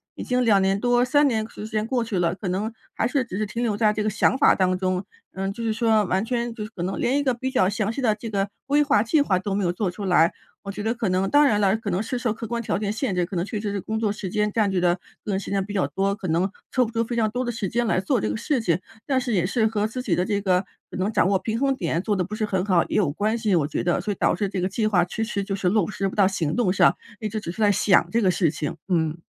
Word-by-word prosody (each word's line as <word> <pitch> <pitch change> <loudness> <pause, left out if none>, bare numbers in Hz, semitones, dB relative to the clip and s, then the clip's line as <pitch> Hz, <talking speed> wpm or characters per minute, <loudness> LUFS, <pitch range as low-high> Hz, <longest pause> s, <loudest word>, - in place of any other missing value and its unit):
已 - - -6
经 250 0 +1
2 210 -4 +4
年 195 +1 +1
多， 245 +2 +3
3 290 +3 +4
年 220 -4 0
时 215 - -8
间 215 -1 -1
过 245 0 0
去 220 -4 -3
了， 170 -1 +1
可 195 - -6
能 195 +5 -1 0.2
还 225 - +1
是 265 +1 0
只 210 -6 -6
是 215 - 0
停 230 +3 -4
留 220 -4 0
在 210 -1 +3
这 210 0 -2
个 215 - +1
想 215 +5 +2
法 280 - +5
当 185 -1 +1
中。 185 0 -1 0.3
嗯， 195 +1 -3
就 230 - -6
是 225 - 0
说 220 -1 +2
完 190 +3 0
全 240 0 -1
就 215 - -5
是 - - -9
可 175 - -6
能 185 +2 -3
连 265 +3 +1
一 - - 0
个 265 - +2
比 260 +2 -4
较 190 -8 +3
详 210 +1 -1
细 275 - -4
的 220 -4 +2
这 225 +2 -8
个 200 -1 -1 0.2
规 285 +2 +3
划、 275 -8 +3
计 285 +6 +2
划 200 -10 +2
都 195 +2 -3
没 200 0 0
有 175 - +1
做 180 +1 -2
出 200 +3 -6
来。 175 -3 +4 0.3
我 200 - -5
觉 205 - -6
得 220 +1 +1
可 235 -3 -2
能 185 +1 +1
当 290 +1 +5
然 210 -6 +2
了， 200 +1 +3
可 220 -2 -5
能 185 +4 0
是 250 +3 -3
受 235 -3 0
客 225 +1 -7
观 235 +1 -3
条 225 - -1
件 205 0 -2
限 220 -2 -2
制， 180 -1 +1
可 185 +1 -5
能 170 - 0
确 215 -1 -4
实 210 -1 -2
是 200 - -2
工 220 +3 -3
作 215 -2 +1
时 205 -2 -5
间 210 +2 0
占 210 -1 +1
据 190 -2 0
的 175 -1 +3 0.3
个 210 - -3
人 190 - 0
时 - - -7
间 195 -1 0
比 205 +1 -7
较 195 - +1
多， 195 +1 0
可 200 -2 -6
能 170 +4 +1 0.2
抽 255 - +3
不 225 - -7
出 230 0 0
非 240 - -4
常 220 -2 +2
多 250 +3 -2
的 240 - -1
时 205 -4 -3
间 235 +3 0
来 185 - +1
做 190 - +1
这 110 - -1
个 105 - -2
事 270 - 0
情。 175 -8 +1 0.3
但 265 -2 +1
是 245 - -3
也 180 -4 +2
是 220 +4 +1
和 215 -1 0
自 250 +3 -5
己 220 -8 -1
的 180 - +1
这 205 0 -1
个 185 -1 +1 0.3
可 - - -6
能 190 +3 0
掌 - - +3
握 195 -1 +2
平 220 +3 -2
衡 275 +2 +2
点 170 -6 -1
做 205 +1 -1
得 185 - +1
不 210 +4 -6
是 215 - -3
很 190 -3 -1
好 180 -4 +3
也 - - -1
有 195 -8 +2
关 215 +8 0
系， 215 -4 +1
我 160 -4 +2
觉 150 - -2
得， 175 0 +1
所 205 +3 -2
以 - - -2
导 - - +2
致 200 +2 -1
这 190 - -3
个 180 - 0
计 215 +3 -1
划 180 -5 +3
迟 220 +5 -3
迟 220 -3 -2
就 195 0 -3
是 190 -2 0
落 205 -1 +2
不 - - -6
实 195 -2 -1
不 - - -9
到 200 -2 +5
行 165 -6 -1
动 230 -7 +1
上， - - +4 0.2
一 215 - -2
直 215 +1 -3
只 205 - -7
是 220 - -6
在 205 -1 +5
想 185 -3 +3
这 235 - +2
个 190 - +4
事 175 -2 +2
情， 150 -1 -4
嗯。 160 -3 +1
205 Hz, 350 characters per minute, -24 LUFS, 185-230 Hz, 0.3 s, 法